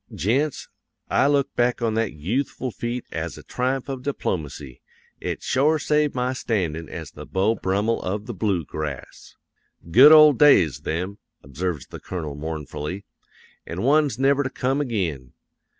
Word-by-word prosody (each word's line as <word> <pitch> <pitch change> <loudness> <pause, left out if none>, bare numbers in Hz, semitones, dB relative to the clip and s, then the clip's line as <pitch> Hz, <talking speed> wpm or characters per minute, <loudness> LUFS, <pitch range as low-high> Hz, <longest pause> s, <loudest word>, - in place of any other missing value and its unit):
Gents, 135 - 0 0.4
I - - +4
look 140 -1 +1
back 120 0 +1
on 115 -1 +1
that 115 -1 -1
yoothful 120 - -3
feat 120 +1 -4
as - - -4
a - - -11
triumph 130 +1 -2
of 135 -2 -5
diplomacy; 75 - -4 0.4
it - - -4
shore 150 +4 +2
saved 150 -1 +1
my 125 +1 0
standin' 85 -10 -2
as 80 -2 -7
the - - -10
Beau 100 +4 +1
Brummel 105 +2 0
of 100 +3 -3
the 120 - -5
Bloo 95 -5 -1
Grass. 75 -3 -7 0.6
"'Good 135 - +9
old 155 -3 +8
days, 95 - +5
them!' 90 +6 -4 0.2
observes 75 +3 -4
the - - -10
Colonel 80 -6 -5
mournfully, 80 +4 -5 0.6
'an' 85 +5 -4
ones 145 +1 +3
never 135 +2 +3
to 130 - -2
come 135 +2 -1
ag'in! 85 - -3
110 Hz, 150 wpm, -23 LUFS, 85-135 Hz, 0.6 s, Good